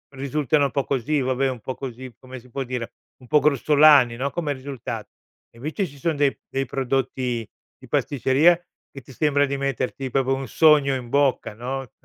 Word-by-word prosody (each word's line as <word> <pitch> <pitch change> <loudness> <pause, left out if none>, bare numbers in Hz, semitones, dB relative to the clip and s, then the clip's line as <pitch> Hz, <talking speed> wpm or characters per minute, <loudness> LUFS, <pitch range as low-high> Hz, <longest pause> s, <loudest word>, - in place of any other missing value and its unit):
risultano 140 +2 +1
un 140 - -2
po' 140 -2 -1
così, 140 +2 0
vabbè 130 +1 0
un 125 -2 -5
po' 130 - -5
così, 130 -1 -8
come 130 0 -10
si 125 +1 -19
può 135 +3 -3
dire, 125 -2 -5 0.2
un 125 - -17
po' 150 +4 +4
grossolani, 145 -3 +5
no, 135 +4 -2
come 155 -4 -2
risulta 130 -2 -6 0.5
e - - -20
invece 155 - -3
ci 145 -2 -15
son 160 +3 0
dei 140 -1 +2
dei 135 0 -2
prodotti 125 -3 -2 0.3
di - - -15
pasticceria 140 +6 +3 0.4
che 135 - -10
ti 125 - -16
sembra 145 +1 +2
di 140 0 -3
metterti 135 -1 -3
proprio 135 +1 +1
un 135 0 -4
sogno 150 -4 +4
in 125 -2 -6
bocca, 140 -4 +1
no. 125 +2 -5
135 Hz, 190 wpm, -23 LUFS, 130-145 Hz, 0.5 s, grossolani